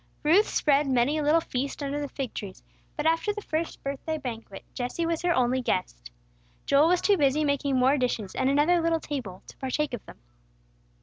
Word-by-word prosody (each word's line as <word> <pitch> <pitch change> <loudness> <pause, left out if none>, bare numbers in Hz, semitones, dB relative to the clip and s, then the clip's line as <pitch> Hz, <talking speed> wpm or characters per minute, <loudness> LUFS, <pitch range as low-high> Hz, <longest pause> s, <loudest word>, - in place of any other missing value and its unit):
Ruth 350 +8 +5
spread 290 -1 +2
many 265 +4 +2
a - - 0
little 300 +3 +4
feast 275 -1 -4
under 285 +1 -2
the 285 - -4
fig 265 -3 -5
trees; 195 -3 -8 0.3
but 300 - -2
after 330 +6 +2
the 420 0 -6
first 320 +1 -3
birthday 280 +3 -3
banquet, 230 -7 -7
Jesse 250 +7 -3
was 330 -1 -1
her 350 0 +1
only 255 -3 +2
guest. 185 -6 -3 0.6
Joel 280 +3 +4
was 355 +1 +2
too 405 -2 +3
busy 290 0 +2
making 285 -1 0
more 265 +3 +3
dishes 230 -6 -2
and 260 0 +1
another 300 +5 +3
little 330 0 +1
table, 250 -13 -6
to - - -14
partake 275 +2 -2
of 240 - -5
them. - - -12
285 Hz, 195 wpm, -27 LUFS, 255-315 Hz, 0.6 s, Ruth